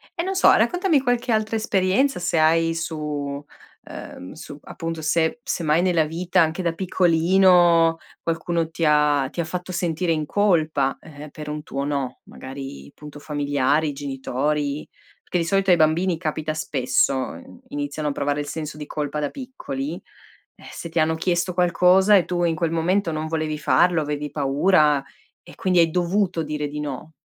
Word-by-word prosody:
e 340 - -2
non 385 +1 -2
so, 380 - +6
raccontami 360 -5 +3
qualche 245 -1 0
altra 220 0 0
esperienza 215 +4 +1
se 175 -2 -1
hai 165 +1 +3
su 150 -4 -4 0.4
ehm, 90 - -9
su 145 -1 -10
appunto, 165 -1 -6
se 160 +7 +1
se 225 -10 -3
mai 155 +2 +3
nella 175 -3 +2
vita, 175 +3 0
anche 165 +3 0
da 170 -2 -1
piccolino, 175 -1 +4 0.2
qualcuno 165 0 -1
ti 165 0 -5
ha 150 -3 +3
ti - - -8
ha 165 - 0
fatto 180 +2 -5
sentire 170 0 -1
in 155 -1 0
colpa 155 -8 +1
eh, 150 -1 -11
per 150 -1 -9
un 150 0 -5
tuo 140 -1 -4
no, 140 -3 -3
magari 130 - -9
punto 150 -1 -11
familiari, 145 0 0
genitori, 140 +2 -2 0.4
perché 180 - -2
di 165 - -1
solito 195 +2 +1
ai 175 - +6
bambini 165 +3 +2
capita 155 -2 -3
spesso, 140 -3 +1
uhm, 90 -8 -6
iniziano 145 +1 -3
a - - -1
provare 145 +1 -1
il 145 - -6
senso 150 0 -5
di 150 -1 -7
colpa 150 0 -4
da 145 - -1
piccoli, 165 - -6 0.6
eh, - - -19
se 170 - -7
ti 165 - -1
hanno 160 +1 +2
chiesto 175 +2 -1
qualcosa 180 +3 +4
e 180 - +2
tu 175 -1 -1
in 165 -1 +1
quel 165 0 -1
momento 170 +2 +1
non 155 0 -3
volevi 155 -1 -2
farlo, 170 +2 +3
avevi 150 0 -3
paura 150 +1 +3 0.4
e - - -15
quindi 185 -2 +1
hai 165 -1 +5
dovuto 180 -1 0
dire 150 -1 -3
di 150 +1 -6
no. 150 +2 -6
160 Hz, 175 wpm, -23 LUFS, 150-180 Hz, 0.6 s, so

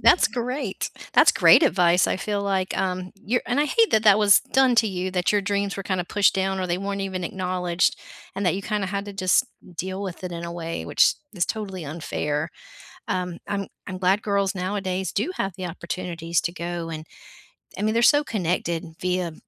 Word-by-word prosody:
that's 355 - +5
great. 250 -2 -3 0.2
That's - - +6
great - - +6
advice. 180 -6 +4
I - - 0
feel, 205 +1 -2
like, 195 -2 -1
um, 185 -1 -2
you're 230 +5 -1
and 245 - 0
I 295 - +4
hate 455 +9 +3
that 220 0 +3
that 205 -1 +7
was 205 -2 +6
done 265 -2 +4
to 225 -1 +5
you 185 -1 -3
that 180 +1 +1
your 205 - +3
dreams 200 0 -1
were 195 - -4
kinda 185 -2 -1
pushed 200 +2 +2
down 190 0 0
or 185 - -1
they 175 0 -1
weren't 200 0 -3
even 190 -2 -3
acknowledged 180 -1 0 0.4
and 195 0 -2
that 175 - +3
you 195 - -4
kinda 210 -2 -1
had 200 +1 -3
to 205 - -6
just 195 +6 +2 0.3
deal 190 +3 -4
with 185 -2 -6
it 180 - -4
in 170 0 -5
a 170 - -5
way 165 -1 -5
which - - +4 0.2
is 175 -3 0
totally 195 -6 -4
unfair. 150 -1 -3 0.6
Um, 180 -2 -2
I'm 200 -1 -2 0.2
I'm 185 - -5
glad 190 +3 +2
girls 200 -2 0
nowadays 190 0 -2
do 225 - -1
have 195 -1 -1
the 185 -2 -4
opportunities 170 -1 -3
to 170 +2 -2
go 170 -1 -4
and 155 -1 -6 0.7
I - - -4
mean 215 +1 +1
they're 235 - +3
so 290 +4 +6
connected 175 - -1 0.2
via 180 -2 -1
190 Hz, 205 wpm, -24 LUFS, 180-205 Hz, 0.7 s, that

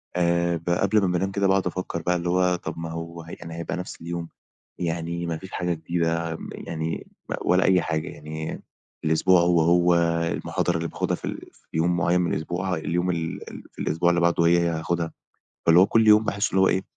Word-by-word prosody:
آآ، 85 -1 +2
ب 85 +2 -6
قبْل 100 +4 +3
ما 95 - +2
بانام 90 +2 0
كده 100 0 +1
باقعُد 95 -1 +2
أفكّر 90 -1 -3
بقى 90 +2 +1
اللي 85 0 -2
هو 90 0 +3
طَب 90 - -6
ما 85 0 -5
هو 85 0 -7
يعني 85 -1 -8
هيبقى 85 +1 -4
نفْس 90 - -7
اليوم، 85 0 -5 0.5
يعني 85 0 -2
ما 85 -1 -2
فيش 95 +4 -11
حاجة 90 -1 -1
جديدة 85 0 -1
م - - -8
يعني 80 0 -4 0.3
ولا 90 +1 +3
أي 95 -2 +4
حاجة، 80 -1 -2
يعني 80 +1 -6 0.4
الأسبوع 85 +3 +4
هو، 85 -1 +3
هو، 85 +1 +4 0.4
المحاضرة 90 -1 -1
اللي 85 0 -2
باخدها - - -1
في - - -9
ال - - -3 0.2
في - - -28
يوم 85 +2 +2
معيّن 90 +1 +2
من 85 - 0
الأسبوع، 90 +4 -2
اليوم 90 +2 -1
ال 85 -2 -2 0.3
في - - -18
الأسبوع 85 +3 +1
اللي 85 0 +2
بعده 85 0 +3
هي، 85 +1 +5
هي 85 0 +1
هاخدها. 85 +1 -2 0.5
فاللي 85 +1 +7
هو 95 - +6
كلّ 115 +1 +3
يوم 105 +1 +7
باحس 100 0 0
اللي 95 - +2
هو 95 - +5
إيه، 95 - +1
85 Hz, 210 wpm, -25 LUFS, 85-90 Hz, 0.5 s, فاللي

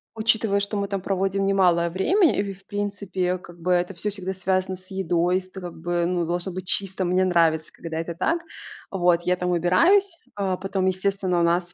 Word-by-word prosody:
Учитывая, 220 -2 +2
что 200 +1 -2
мы 200 -1 -1
там 195 -1 -3
проводим 195 +1 0
немалое 180 -3 +3
время 315 - +3
и - - +2
и, - - -4
в 195 +1 -20
принципе, 200 -3 -2
как 175 -1 -14
бы, 180 +2 0
это 180 +2 +1
всё 195 +4 -3
всегда 190 -2 -4
связано 185 0 -1
с 185 0 -18
едой, 180 -1 +1
с 185 - -12
т 190 - -9
это, - - -11
как 175 -2 -7
бы, 175 +1 0
ну, 175 -1 0
должно 175 +3 -2
быть 185 +1 -6
чисто, 190 -1 0
мне 180 +1 +2
нравится, 165 -3 +2
когда 165 -1 -7
это 165 0 -4
так. 335 - 0 0.5
Вот 175 -2 +2
я 180 +1 +2
там 180 0 -2
выбираюсь, 335 - +3 0.2
э, 190 -2 0
потом, 195 -1 -1
естественно, 190 -1 0
у - - +3
нас 175 +1 +1
185 Hz, 215 wpm, -24 LUFS, 175-195 Hz, 0.5 s, немалое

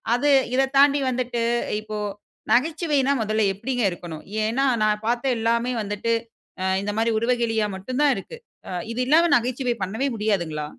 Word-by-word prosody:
அது 290 +4 +1 0.3
இதை 270 +1 +4
தாண்டி 285 +1 +6
வந்துட்டு 245 -1 -2 0.4
இப்போ, 215 0 -6 0.5
நகைச்சுவைனா 295 0 +2
முதல்ல 215 0 0
எப்படிங்க 245 +5 -2
இருக்கணும்? 170 -3 -8 0.2
ஏனா 235 +6 +1 0.2
நான் 210 0 +1
பார்த்த 245 +2 +1
எல்லாமே 230 +2 +1
வந்துட்டு, 205 +2 -2 0.7
இந்த 205 - -2
மாதிரி 225 +1 +2
உருவகேளியா 230 -2 +1
மட்டும் 250 +8 -5
தான் 290 - +5
இருக்கு, 195 - -8 0.6
இது 235 - -5
இல்லாம 325 +5 +5
நகைச்சுவை 245 +1 0
பண்ணவே 220 +9 -2
முடியாதுங்களா? 175 -8 -1
235 Hz, 140 wpm, -23 LUFS, 215-260 Hz, 0.7 s, தாண்டி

